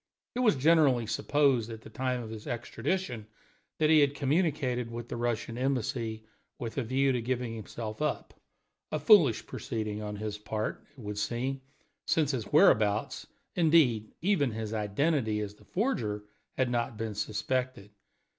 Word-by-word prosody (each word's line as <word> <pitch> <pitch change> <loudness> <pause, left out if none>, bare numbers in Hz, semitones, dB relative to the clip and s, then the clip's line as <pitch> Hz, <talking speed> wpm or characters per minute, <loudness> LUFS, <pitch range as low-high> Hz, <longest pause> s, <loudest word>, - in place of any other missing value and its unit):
It - - -3
was 230 -9 +4
generally 140 -4 +4
supposed 130 0 +2
at 110 -1 -7
the - - -12
time 125 -1 -2
of 110 - -8
his 110 +2 -8
extradition 120 - -3 0.5
that 155 0 +3
he 155 - +7
had 145 -1 +3
communicated 140 -5 0
with 115 0 -7
the - - -4
Russian 120 0 -2
Embassy, 120 -4 -1 0.3
with 115 -2 -5
a - - 0
view 135 +4 +2
to 125 -2 0
giving 125 -1 -2
himself 110 +1 -6
up 150 - -2 0.6
a - - 0
foolish 170 - +5
proceeding 110 -4 -4
on 105 -1 -4
his 105 0 -4
part, 110 0 -3
it - - -14
would 105 -2 -5
seem, 130 +5 -2 0.5
since 150 -3 +2
his 120 -6 -2
whereabouts, 105 0 +3 0.3
indeed 150 -10 +3
even 170 - +2
his 110 0 -4
identity 110 +2 0
as 105 -1 -4
the - - -21
forger, 115 - -1 0.3
had 130 -2 +1
not 120 -2 -1
been 110 -1 -3
suspected. 110 +1 -2
120 Hz, 155 wpm, -30 LUFS, 110-140 Hz, 0.6 s, he